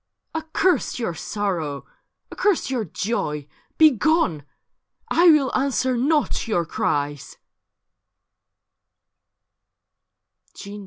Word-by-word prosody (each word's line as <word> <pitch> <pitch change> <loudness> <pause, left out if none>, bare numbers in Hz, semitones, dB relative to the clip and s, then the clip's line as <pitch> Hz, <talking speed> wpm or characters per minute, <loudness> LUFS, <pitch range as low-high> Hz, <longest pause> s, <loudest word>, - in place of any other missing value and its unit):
* - - -54
Accurst 320 0 0
your 230 -8 -2
sorrow, 165 -6 -3 0.5
accurst 395 -9 0
your 240 -5 -1
Joy 150 -6 -3
— - - -41
Begone! 305 - +3 0.7
1 345 0 +7
will 280 -4 +2
answer 260 -1 +1
not 285 +1 0
your 175 -7 0
cries.' 145 -2 -2
240 Hz, 85 wpm, -23 LUFS, -, 0.7 s, 1